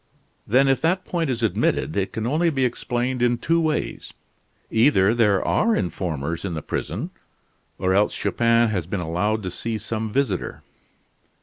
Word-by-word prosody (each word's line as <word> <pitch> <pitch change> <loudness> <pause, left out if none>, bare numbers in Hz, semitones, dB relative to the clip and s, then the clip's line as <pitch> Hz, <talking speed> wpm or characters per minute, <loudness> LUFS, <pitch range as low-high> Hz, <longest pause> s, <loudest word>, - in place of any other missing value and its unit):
"Then 130 +5 +4
if 135 -2 +2
that 180 +3 +1
point 165 -4 -1
is 120 -2 -2
admitted 100 -6 0
it 95 -1 -1
can 110 0 -3
only 155 +7 +2
be 135 -4 +1
explained 125 +1 -2
in 120 0 +3
two 165 +7 +1
ways. 155 -1 -2 0.6
Either 110 -4 +4
there 105 -5 +2
are 225 0 +2
informers 85 -3 -3
in 95 -4 -3
the 80 - -5
prison, - - -4 0.7
or 95 +1 +1
else 105 +2 +2
Chupin 115 0 +2
has 90 -6 -2
been 95 - -2
allowed 95 +6 -1
to 90 - -4
see 115 +4 -3
some 110 +1 -4
visitor." 125 -7 -1
115 Hz, 165 wpm, -23 LUFS, 95-130 Hz, 0.7 s, Then